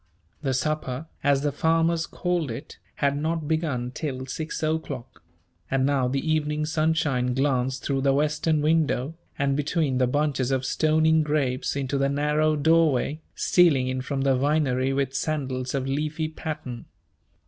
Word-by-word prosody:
The 135 -3 0
supper 140 0 -2 0.2
as 140 -1 +3
the 145 - +1
farmers 165 +2 +1
called 175 -5 -1
it 120 +6 -8 0.2
had 140 -1 +1
not 160 +1 -2
begun 150 -6 -1
till 130 -2 -4
six 155 +5 -5
o'clock; 155 -5 -3 0.5
and 135 0 +1
now 135 -2 +2
the 135 +5 -2
evening 150 -1 0
sunshine 155 -6 +1
glanced 130 -1 0
through 135 -1 0
the 135 0 +3
western 150 +2 +1
window, 155 -3 +1 0.2
and 140 0 +1
between 145 -2 0
the 125 - +3
bunches 140 -1 0
of 130 -1 0
stoning 155 +2 +3
grapes 145 -5 0
into 140 0 -1
the 140 0 +2
narrow 150 +2 +1
doorway, 155 -1 +2
stealing 155 -8 +4
in 130 0 -2
from 135 +1 -3
the 135 -1 +3
Vinery 135 -1 +1
with 135 -1 -1
sandals 135 -3 -2
of 135 -1 -1
leafy 150 +3 -1
pattern. 150 -7 -6
145 Hz, 150 wpm, -25 LUFS, 130-155 Hz, 0.5 s, stealing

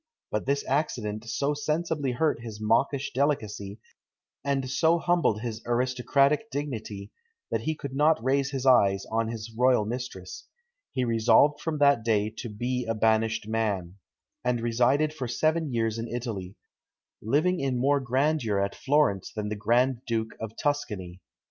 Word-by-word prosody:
But 105 +4 -2
this 140 +1 0
accident 120 -7 -1
so 140 +4 0
sensibly 150 -2 -1
hurt 150 -1 0
his 110 -3 -8
mawkish 130 +6 +1
delicacy, 110 -7 -1 0.6
and 140 -2 0
so 160 +5 +3
humbled 170 -11 +1
his 115 -2 -4
aristocratic 130 - +2
dignity, 110 - -5 0.4
that - - 0
he 160 - -1
could 140 -3 -7
not 150 +3 +4
raise 135 +1 +1
his 135 -1 -4
eyes 100 -7 +4
on 115 0 +1
his 115 0 -6
royal 125 -2 +3
mistress. 110 -6 -6 0.4
He 130 -1 -1
resolved 115 +5 +4
from 160 -2 -2
that 140 -5 +4
day 110 -2 +1
to 120 - -5
"be 125 +4 -2
a 115 - 0
banished 110 0 +1
man," 100 -5 -2 0.5
and 125 -1 +1
resided 125 +6 +2
for 135 -5 -4
seven 155 +5 0
years 115 -1 -1
in 115 - -4
Italy, 110 -6 -5 0.7
living 155 - +1
in 135 -2 -1
more 140 +3 +3
grandeur 130 -4 +1
at 100 0 -1
Florence 135 -9 +1
than 105 -2 -4
the 105 - -2
Grand 120 +4 +2
Duke 115 -1 -2
of 110 0 -7
Tuscany. 100 -11 -2
120 Hz, 155 wpm, -27 LUFS, 110-140 Hz, 0.7 s, not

